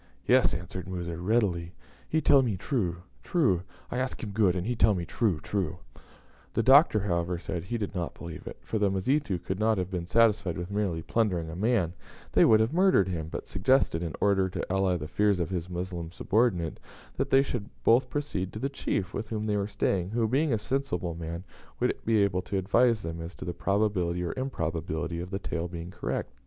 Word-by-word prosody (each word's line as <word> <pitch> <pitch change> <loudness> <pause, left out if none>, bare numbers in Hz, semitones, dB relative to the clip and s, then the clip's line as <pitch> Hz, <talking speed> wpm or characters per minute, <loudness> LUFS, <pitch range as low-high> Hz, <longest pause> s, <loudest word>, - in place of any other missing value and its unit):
"Yes," - - +4
answered 90 +2 -6
Musa, 85 -2 -4
readily; 90 -4 0 0.3
"he 160 - +2
tell 140 -3 +6
me 115 -7 -1
true, 90 - -2 0.2
true. 130 - +2 0.3
I 125 - -1
ask 130 0 -3
him 105 - -4
good, 100 -3 +3
and 90 0 -2
he 120 - -1
tell 110 -2 +4
me 85 -2 -3
true, 100 -3 0
true." 90 +1 -2 0.8
The - - +2
Doctor, 135 -5 +6
however, 85 -2 -1
said 85 0 -5
he 120 +5 -2
did 100 -4 -3
not 90 -3 -3
believe 85 -1 -8
it, - - -7
for 110 - -3
the 100 -1 +3
Mazitu 100 +3 0
would 95 +1 -2
not 110 0 +2
have 90 0 -2
been 85 -2 -3
satisfied 105 -4 +3
with 90 +2 -5
merely 95 -6 -1
plundering 90 -8 0
a - - -7
man, 100 -4 +1 0.4
they - - +5
would 110 - +6
have 110 +6 +1
murdered 180 - +4
him; 80 -3 -3
but - - -6
suggested, 95 -4 +2
in 85 -2 -4
order 95 -2 +3
to 95 +1 -3
allay 95 -2 +2
the 75 -2 -6
fears 100 +3 +2
of 85 +1 -2
his 90 -1 -3
Moslem 90 -2 -4
subordinate, 95 -3 0 0.4
that - - 0
they 135 0 +5
should 120 -6 -4
both 125 +3 +4
proceed 120 -9 -3
to - - -5
the 135 +5 -1
chief 100 -8 -2
with 105 +1 -4
whom 110 -1 -2
they 105 -1 0
were 100 -1 0
staying, 95 -3 0
who, 115 +1 +1
being 140 +6 +1
a 115 - +3
sensible 105 -8 -2
man, 85 +1 -5 0.4
would - - +1
be 110 -2 +4
able 90 -2 +1
to 95 +2 -3
advise 110 +4 +3
them 80 0 -5
as 85 +2 -7
to - - -8
the 90 - -3
probability 90 -2 0
or 85 - -2
improbability 85 - -3
of 90 +1 -5
the 95 - -2
tale 85 -3 -3
being 85 0 -7
correct. 80 - -3
95 Hz, 210 wpm, -28 LUFS, 85-110 Hz, 0.8 s, tell